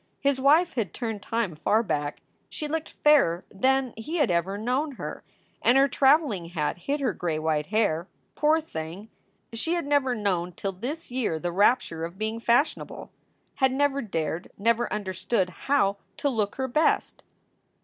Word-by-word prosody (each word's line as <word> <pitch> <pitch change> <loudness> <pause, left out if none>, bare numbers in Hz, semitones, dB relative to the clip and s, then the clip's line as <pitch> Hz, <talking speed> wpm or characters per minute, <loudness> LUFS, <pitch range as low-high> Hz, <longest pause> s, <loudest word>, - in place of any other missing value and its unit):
His 275 -1 +1
wife 315 +6 +4
had 220 -9 -2
turned 225 -4 -4
time 225 -6 -1
far 210 +8 +1
back; 145 -7 -2 0.3
she 305 - -5
looked 320 +1 -3
fairer 270 - +5
than 260 +4 +1
he 300 +10 -4
had 290 - +3
ever 175 +4 0
known 255 +7 -1
her; - - -7 0.4
and 245 - +5
her 275 +1 +6
traveling 270 - +3
hat 165 -1 -2
hid 280 +11 -2
her 250 -7 +1
gray 170 -4 -2
white 155 -1 0
hair. 190 -6 +1 0.3
Poor 305 +2 +3
thing! 180 - -7 0.4
She 325 +10 -1
had 340 - -2
never 285 -3 +2
known 180 -5 -1
till 195 +3 -3
this 250 - -6
year 240 -10 -1
the 175 +2 -3
rapture 180 -4 +2
of 170 +3 -6
being 220 +2 -2
fashionable; 240 +6 0 0.5
had 265 -1 +3
never 280 +1 +1
dared, 165 - -3
never 230 +3 +1
understood 190 0 -1
how, 200 -2 +1 0.2
to 285 - 0
look 215 -5 -1
her 265 -1 -2
best. 300 +6 +1
225 Hz, 165 wpm, -26 LUFS, 180-275 Hz, 0.5 s, her